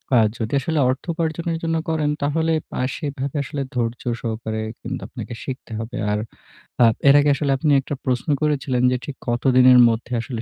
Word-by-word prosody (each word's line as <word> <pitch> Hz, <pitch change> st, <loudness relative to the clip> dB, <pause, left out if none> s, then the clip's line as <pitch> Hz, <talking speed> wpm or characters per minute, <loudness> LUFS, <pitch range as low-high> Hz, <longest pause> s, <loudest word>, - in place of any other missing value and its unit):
আ -, -, +7 dB, 0.2 s
যদি 110 Hz, +1 st, -4 dB
আসলে 160 Hz, +3 st, -1 dB
অর্থ 130 Hz, +1 st, -2 dB
উপার্জনের 165 Hz, 0 st, -2 dB
জন্য 165 Hz, 0 st, 0 dB
করেন, 155 Hz, -2 st, 0 dB
তাহলে 160 Hz, +3 st, +1 dB, 0.2 s
পা -, -, -4 dB, 0.2 s
সেভাবে 140 Hz, -1 st, -4 dB
আসলে 140 Hz, +1 st, -4 dB
ধৈর্য 115 Hz, -1 st, -2 dB, 0.2 s
সহকারে 110 Hz, -1 st, -3 dB, 0.2 s
কিন্তু -, -, -5 dB
আপনাকে -, -, -8 dB
শিখতে 130 Hz, -3 st, -7 dB
হবে। 115 Hz, +3 st, -5 dB
আর 105 Hz, -, 0 dB, 0.6 s
আ -, -, +8 dB, 0.2 s
এর 140 Hz, -, +7 dB
আগে 145 Hz, -, +3 dB
আসলে 140 Hz, -1 st, -1 dB
আপনি 150 Hz, +2 st, +1 dB
একটা 145 Hz, -, -5 dB
প্রশ্ন 125 Hz, +2 st, -1 dB
করেছিলেন 135 Hz, -4 st, 0 dB
যে, 125 Hz, -, +1 dB
ঠিক 145 Hz, -, -6 dB
কতদিনের 125 Hz, +1 st, +5 dB
মধ্যে 115 Hz, +2 st, -3 dB
আসলে 115 Hz, -2 st, -5 dB
135 Hz, 180 wpm, -22 LUFS, 120-150 Hz, 0.6 s, আ